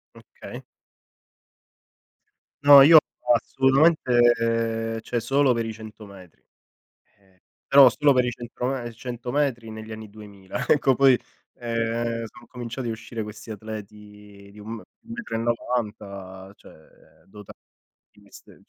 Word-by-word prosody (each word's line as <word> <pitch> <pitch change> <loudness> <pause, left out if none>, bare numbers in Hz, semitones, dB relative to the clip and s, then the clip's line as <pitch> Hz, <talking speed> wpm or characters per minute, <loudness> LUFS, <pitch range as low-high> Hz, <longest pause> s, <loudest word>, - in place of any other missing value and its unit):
Okay. - - -12 2.0
No, 145 -1 +9
io 160 +4 +9 0.4
assolutamente, 120 -5 +2
cioè 120 +1 -3
solo 135 +2 +2
per 115 -1 -2
i 110 - -5
100 110 -1 -12
metri. 95 -4 -16 0.8
Ehm, 95 -2 -30 0.3
però 135 -1 +8
solo 145 +3 +2
per 125 -2 +2
i - - -1
100 120 0 -6
me 125 -3 -4
100 120 +1 -7
metri 130 -6 -1
negli 110 0 -9
anni 110 -1 -9
2000; 100 -3 -8
ecco 135 -3 +3
poi, 135 -1 +4 0.4
ehm, 115 0 -3
sono 120 - -16
cominciati 120 0 -6
a 115 - -2
uscire 115 0 -7
questi 105 +2 -10
atleti 105 -1 -11
di 105 - -16
1 110 +2 -7
m - - -6
1 - - -14 0.3
metro 235 - -7
e - - 0
90, 105 -5 -4
cioè, - - -17 0.5
dotati 105 0 -14 0.5
di - - -23
queste - - -17
cioè, - - -17
dota - - -28
115 Hz, 140 wpm, -24 LUFS, 105-125 Hz, 2.0 s, No